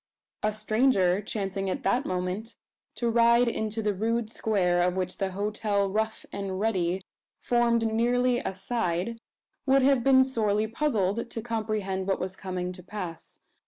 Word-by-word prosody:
A 215 - +1
stranger, 215 -3 +2
chancing 195 -2 -3
at 270 +8 -3
that 245 - +1
moment 185 +5 -3 0.4
to 235 - -1
ride 235 +1 +4
into 220 -1 -2
the 210 -1 +1
rude 225 +3 -1
square 180 -5 +1
of 180 0 +1
which 185 -1 -3
the 190 -2 -1
hotel 205 0 0
"Rough 220 +2 -2
and 195 -1 -4
Ready" 190 -4 0 0.4
formed 235 -1 +2
nearly 245 +2 +2
a 275 - -3
side, 195 +1 -2 0.5
would 270 0 +5
have 270 -2 +4
been 260 0 +6
sorely 215 -5 +1
puzzled 225 -3 0
to 225 - -5
comprehend 215 -5 -2
what 195 - +1
was 185 0 -4
coming 180 -2 -4
to 180 - -11
pass. 180 -3 -8
215 Hz, 155 wpm, -27 LUFS, 190-235 Hz, 0.5 s, been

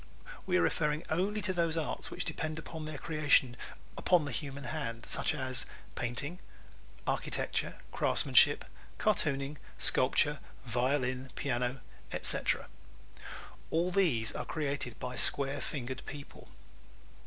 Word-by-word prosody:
We 180 -1 +3
are - - +4
referring 150 -1 +1
only 200 +5 +1
to 185 - 0
those 165 -2 +1
arts 160 - -2
which - - -3
depend 155 0 -3
for 160 -1 -6
their 155 -1 -5
creation 145 -5 +3 0.4
upon 175 -4 +3
the 140 - -4
human 140 -2 -4
hand 125 -6 -4
such - - +2
as 130 -3 -1 0.3
painting, 140 +9 -3 0.7
architecture, - - -1
craftsmanship, - - +4 0.3
cartooning, 145 -8 +1 0.2
sculpture, 145 +3 +3 0.3
violin, 130 +2 0
piano, 125 -2 -1 0.3
etc. - - 0 1.0
_All 175 +3 +1
these 135 - +3
are - - -2
created 140 -6 -2
by 125 0 -4
square 140 0 +3
fingered 130 -2 -4
people. 145 0 -9
145 Hz, 120 wpm, -32 LUFS, 130-160 Hz, 1.0 s, are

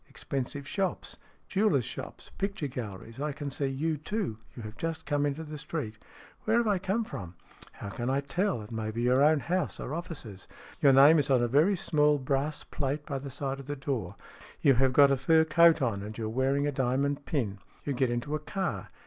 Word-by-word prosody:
Expensive 140 +1 -4
shops. 190 +4 -2 0.3
Jewellers' 190 - +2
shops, - - -8
picture 195 -4 -2
galleries. 115 -2 -6
I 150 0 -2
can 145 0 -5
see 135 +1 -1
you, 150 +4 -1
too. 165 - -3 0.2
You 120 - -8
have 110 0 -8
just 165 +4 -4
come 145 0 +1
into 145 +3 -3
the 150 -1 -7
street." 115 -9 -5 0.2
" - - -24
Where 220 +2 +3
have 235 - +3
I 200 -3 +2
come 200 +5 0
from? 100 - -7
" - - -25
" - - -14
How 100 - -7
can 120 +4 -3
I 135 +1 +1
tell? 175 - -1
It 105 - -12
may 110 -1 -3
be 115 +2 -3
your 125 +2 +4
own 150 0 +5
house 185 +1 -1
or 140 - -5
offices. 155 - -6 0.3
Your 140 - +6
name 140 +4 +8
is 145 - +1
on 130 -3 +4
a - - +2
very 155 - +4
small 150 -4 +3
brass 140 +2 -1
plate 145 +1 -3
by 140 -2 -3
the 140 +1 -7
side 135 0 -3
of 135 - -10
the 145 - -3
door. 125 -9 -3 0.4
You 140 - +5
have 130 +1 +3
got 140 +1 +6
a 135 - +3
fur 160 +5 +4
coat 165 -1 +5
on, 110 -6 0
and 105 +2 -7
you 115 - -3
are - - -2
wearing 135 +4 +1
a 145 - +1
diamond 140 +2 0
pin. 105 -10 -1 0.3
You 145 - -1
get 130 -1 +1
into 120 +5 -2
a 155 - 0
car. 190 +5 -3
140 Hz, 225 wpm, -29 LUFS, 125-155 Hz, 0.4 s, name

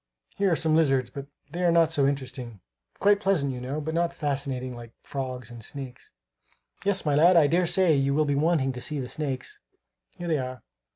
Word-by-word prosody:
Here 195 -1 +2
are - - +4
some 160 -1 +2
lizards, 135 -6 +2
but 140 0 -7 0.2
they 175 +3 -4
are 175 - +4
not 165 -1 +4
so 140 -4 +3
interesting; 130 -5 -4 0.4
quite 205 0 +4
pleasant, 190 -9 +1
you 125 -1 -6
know, 135 +4 -3
but 155 +1 -4
not 170 +1 0
fascinating, 135 -4 -3
like 120 -1 -11
frogs 130 -4 -5
and 120 -2 -10
snakes. 130 0 -8 0.7
Yes, 200 -2 0
my 150 - +2
lad, 170 +5 +6
I 160 - +7
dare 170 +4 +2
say 185 -2 +3
you 140 0 +1
will 155 +1 +3
be 145 - +1
wanting 145 -2 +2
to 125 -1 -7
see 150 +2 -3
the 130 - -4
snakes. 135 -2 -4 0.6
Here 175 - -5
they 160 -3 +1
are. 130 -1 -6
145 Hz, 210 wpm, -26 LUFS, 130-165 Hz, 0.7 s, I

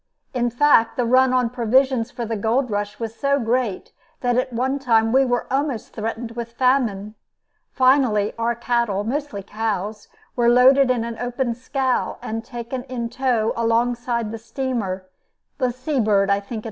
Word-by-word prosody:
In 240 -1 0
fact, 240 -2 +3
the 245 - +1
run 255 +2 +4
on 250 -2 +1
provisions 250 0 +2
for 240 -1 -5
the 225 0 -3
gold 225 +4 0
rush 205 0 -3
was 225 -1 -4
so 280 +3 +1
great 235 -5 -1 0.3
that 245 -1 +1
at 255 +1 0
one 260 +4 -1
time 225 -4 +2
we 265 +2 +5
were 245 -1 0
almost 275 -5 -2
threatened 225 +1 -4
with 230 0 -6
famine. 235 -6 +1 0.6
Finally 255 -6 +3
our 230 +1 -1
cattle, 235 -4 0
mostly 250 -3 -3
cows, 210 0 -3 0.3
were 235 -1 +3
loaded 255 +2 +6
in 245 -2 +1
an 230 -1 -6
open 245 0 -2
scow 260 +1 -1
and 225 +1 -5
taken 240 +1 -6
in 240 -3 -4
tow 240 -4 0
alongside 235 0 0
the 225 - -6
steamer, 225 -7 -3 0.5
the 255 -1 +1
Sea 255 +3 -2
Bird, 200 -3 +2
I 200 - +3
think 200 - -18
it - - -2
was. - - -3
235 Hz, 170 wpm, -22 LUFS, 225-255 Hz, 0.6 s, loaded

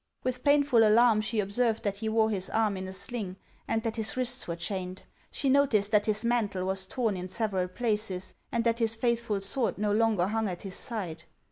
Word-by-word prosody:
With 250 0 -2
painful 285 -5 +4
alarm 220 0 +5
she 220 +1 -1
observed 220 +3 0
that 200 -1 -2
he 220 +1 -3
wore 220 0 +2
his 190 -2 -1
arm 220 -2 +1
in 185 0 -5
a - - -6
sling, 195 0 -3 0.3
and 225 0 -1
that 225 0 -3
his 220 +2 +1
wrists 255 0 +2
were 170 - -3
chained; 185 +1 -4 0.3
she 275 - -3
noticed 260 -7 +3
that 210 0 +3
his 215 +1 0
mantle 210 -6 0
was 190 0 -1
torn 225 -2 -1
in 180 0 -5
several 190 -3 -1
places, 210 -2 -2 0.2
and 235 -1 0
that 230 0 +1
his 225 -1 +2
faithful 235 -3 0
sword 225 +5 0
no 210 0 0
longer 215 -4 +2
hung 220 +2 -1
at 175 -1 -6
his 195 -2 -6
side. 180 -10 -5
215 Hz, 210 wpm, -28 LUFS, 195-235 Hz, 0.3 s, alarm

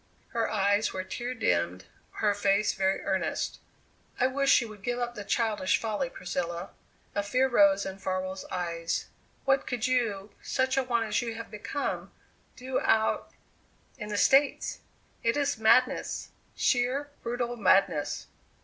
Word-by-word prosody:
Her 230 -1 -1
eyes 205 +1 +2
were 185 - -3
tear 240 +6 -4
dimmed, 90 - 0 0.3
her 210 -1 +1
face 200 +1 +2
very 190 0 +1
earnest. - - -1 0.6
"I 250 - +4
wish 275 +1 +4
you 235 - -3
would 210 -2 -12
give 245 +4 -2
up 240 -1 -2
the 210 - -6
childish 215 -3 +1
folly, 225 +4 -2
Priscilla." 175 -2 -4 0.4
A 205 - +1
fear 255 +6 +2
rose 200 -5 +4
in 190 0 -6
Farwell's 185 0 -3
eyes. 170 -2 -2 0.4
"What 270 0 +2
could 245 -2 -1
you, 220 -6 0
such 260 0 0
an 265 -2 +1
one 235 -2 +2
as 215 -1 0
you 230 -2 -4
have 230 0 -8
become, 215 +7 -3 0.4
do 255 +1 -2
out 220 0 +2 0.7
in 210 -1 -5
the 205 - -2
States? 275 +6 +3 0.4
It 230 +4 +1
is 285 -4 0
madness 230 +3 +3 0.3
sheer, 260 +3 +1
brutal 240 0 -2
madness." 190 -7 +2
220 Hz, 150 wpm, -29 LUFS, 195-250 Hz, 0.7 s, I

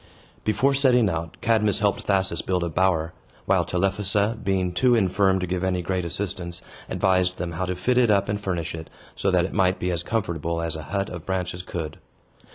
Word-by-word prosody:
Before 130 +6 +2
setting 125 -6 +4
out, 80 0 -4
Cadmus 110 -3 +2
helped 105 -2 0
Thasus 95 -1 +1
build 90 -2 -1
a 85 - -1
bower; 85 -1 +1 0.3
while - - +3
Telephassa, 100 +3 +1
being 95 -2 0
too 120 +8 +3
infirm 95 -2 +3
to 90 - -1
give 90 +1 -2
any 90 -1 0
great 90 0 -1
assistance, 85 -1 -4 0.3
advised 95 -1 +1
them 85 0 -3
how 90 +3 -3
to 90 - -2
fit 125 +8 +1
it 120 -3 +4
up 100 -1 +3
and 105 0 -2
furnish 90 -5 -2
it, 80 -1 -7 0.3
so 95 - 0
that 90 -2 +3
it 95 - -6
might 95 -2 +2
be 90 - -1
as 85 -2 -1
comfortable 85 -5 -2
as 85 -1 -1
a 80 - -5
hut 100 0 -1
of 90 -3 -8
branches 90 -1 -2
could. 80 -4 -6
95 Hz, 200 wpm, -24 LUFS, 85-100 Hz, 0.3 s, setting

